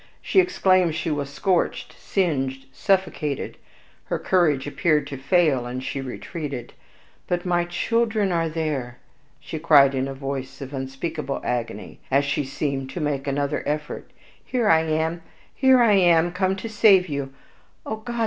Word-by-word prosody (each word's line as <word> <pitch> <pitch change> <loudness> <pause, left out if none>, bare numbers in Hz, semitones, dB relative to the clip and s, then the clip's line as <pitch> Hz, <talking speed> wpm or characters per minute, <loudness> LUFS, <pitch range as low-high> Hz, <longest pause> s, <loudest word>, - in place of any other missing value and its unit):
She - - +2
exclaimed 185 - +3
she 160 - -2
was 145 -2 -2
scorched, 180 +5 -1
singed, 135 -8 -1
suffocated; 185 -8 -1 0.5
her - - -2
courage 155 -8 +2
appeared 145 +1 +1
to 145 -1 -6
fail, 135 -3 +2
and 130 +1 -5
she 135 - -3
retreated. 135 -1 -6 0.5
"But 175 0 -1
my 175 -1 +1
children 220 +3 0
are 165 -2 0
there!" 150 -6 -3 0.4
she 145 +2 -6
cried 145 -4 +6
in 130 0 -1
a 135 - -6
voice 135 -1 -5
of 135 0 -8
unspeakable 135 +2 -4
agony, 115 -4 -4
as 140 +1 +3
she 140 +1 0
seemed 135 0 -3
to 175 - -6
make 145 -2 -2
another 140 0 -1
effort; 150 0 -3 0.3
"here 245 -4 -1
I 160 -3 +5
am 160 +2 -1 0.3
here 260 -2 +5
I 220 -3 +5
am 175 -3 +4
come 185 +1 0
to 195 +4 -6
save 205 -4 +5
you. 140 -3 -4 0.5
Oh 220 - -3
God! 235 +2 -6
155 Hz, 155 wpm, -23 LUFS, 135-180 Hz, 0.5 s, cried